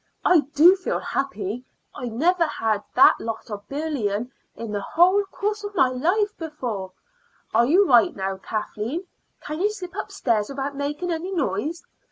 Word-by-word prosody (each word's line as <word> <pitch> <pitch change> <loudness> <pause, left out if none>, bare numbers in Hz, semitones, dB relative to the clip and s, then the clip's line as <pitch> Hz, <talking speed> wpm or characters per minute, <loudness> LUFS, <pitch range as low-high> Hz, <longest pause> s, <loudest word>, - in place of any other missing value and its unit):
I 360 - +6 0.2
do 340 +6 +8
feel 375 - -2
happy! 240 -4 -3 0.3
I 250 - -5
never 335 +9 +2
had 220 -8 -1
all - - -23
that - - +7
lot 225 0 -5
of 205 0 -7
bullion 255 -7 -2 0.2
in 230 -2 -6
the 205 -1 -2
whole 365 - +4
course 420 +2 -3
of 410 0 -6
my 265 - +4
life 360 +12 0
before. 240 - -5 0.6
Are 235 +2 +4
you 370 +8 +5
right 240 -4 +5
now, 195 0 -3
Kathleen 220 - -4 0.4
can 305 +3 -5
you 410 - +3
slip 370 -4 -8
upstairs 235 - -1
without 275 +1 -4
making 295 +5 -3
any 335 +3 -3
noise? 300 - -2
280 Hz, 165 wpm, -24 LUFS, 220-355 Hz, 0.6 s, do